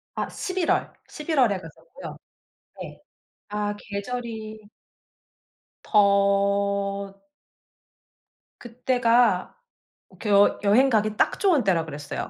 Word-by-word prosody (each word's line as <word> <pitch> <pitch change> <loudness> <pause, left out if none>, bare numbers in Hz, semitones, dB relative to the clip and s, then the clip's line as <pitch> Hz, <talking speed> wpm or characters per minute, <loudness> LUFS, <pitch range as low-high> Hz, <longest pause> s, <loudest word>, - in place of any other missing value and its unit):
아. - - -3
11월, 370 -4 -2
11월 295 -7 0
에 - - -3
갔었고요. 165 -3 -12 0.6
네. - - -9 0.5
아 205 0 -2
계절이 220 +1 -6 1.2
더 200 -1 +1 1.4
그때가 240 -4 +1 0.6
그 215 - -4
여 200 0 +4
여행 230 +7 +4
가기 215 -2 0
딱 - - +1
좋은 355 -9 +3
때라 175 -5 +1
그랬어요. 145 -2 -6
210 Hz, 155 characters per minute, -24 LUFS, 200-245 Hz, 1.4 s, 여